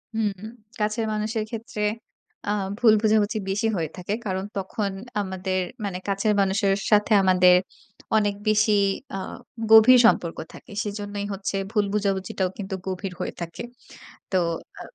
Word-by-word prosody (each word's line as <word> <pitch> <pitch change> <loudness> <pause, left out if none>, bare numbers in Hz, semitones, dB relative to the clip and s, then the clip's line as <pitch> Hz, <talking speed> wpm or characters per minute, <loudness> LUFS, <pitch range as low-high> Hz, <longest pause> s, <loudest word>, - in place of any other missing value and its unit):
হুম, 220 -2 +1 0.5
কাছের 215 +2 0
মানুষের 215 +1 -1
ক্ষেত্রে 225 -2 -6 0.7
আ - - +2 0.3
ভুল 225 -3 +6
বোঝাবুঝি 215 -1 +2
বেশি 210 +4 0
হয়ে 160 -4 -2
থাকে। 180 +3 -3
কারণ 190 -1 -2
তখন 195 +1 -2 0.3
আমাদের 190 -1 -2 0.3
মানে, 185 -2 -3
কাছের 200 +2 +1
মানুষের 195 +1 +2 0.2
সাথে 210 +1 +4
আমাদের 180 -1 +6 0.6
অনেক 205 -1 +1
বেশি 215 0 +3 0.4
আ - - -2 0.5
গভীর 240 +3 +9
সম্পর্ক 170 -7 +3 0.2
থাকে। - - -13
সেজন্যই 205 -1 -4
হচ্ছে 195 0 -4 0.2
ভুল 210 -2 +2
বোঝাবুঝিটাও 195 -2 -1
কিন্তু 190 -1 -4
গভীর 185 0 -4
হয়ে - - -3
থাকে। 170 +7 -6 0.7
তো 190 - +2 0.4
আ - - -7
205 Hz, 135 wpm, -24 LUFS, 190-215 Hz, 0.7 s, গভীর